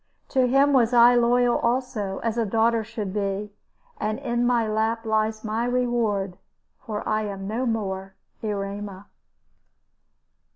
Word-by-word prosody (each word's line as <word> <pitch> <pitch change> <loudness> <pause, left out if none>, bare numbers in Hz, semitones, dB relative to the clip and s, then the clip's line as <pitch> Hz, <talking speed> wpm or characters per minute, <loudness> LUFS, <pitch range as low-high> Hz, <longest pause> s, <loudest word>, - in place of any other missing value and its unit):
To 260 -2 +2
him 275 +3 +4
was 245 -2 +3
I 240 +1 +8
loyal 245 0 +3
also, 235 -5 -1
as 230 -1 -1
a 235 - +1
daughter 225 +2 +2
should 215 -3 -5
be; 200 0 -2 0.5
and 215 0 -1
in 240 -3 0
my 235 -2 +2
lap 220 +1 -1
lies 220 0 0
my 220 +1 -1
reward 235 -6 0 0.4
for 215 -5 -5
I 215 0 +1
am 195 -1 -6
no 235 +5 -1
more 195 -4 -3 0.3
Erema. 200 -2 -4
220 Hz, 135 wpm, -24 LUFS, 205-240 Hz, 0.5 s, I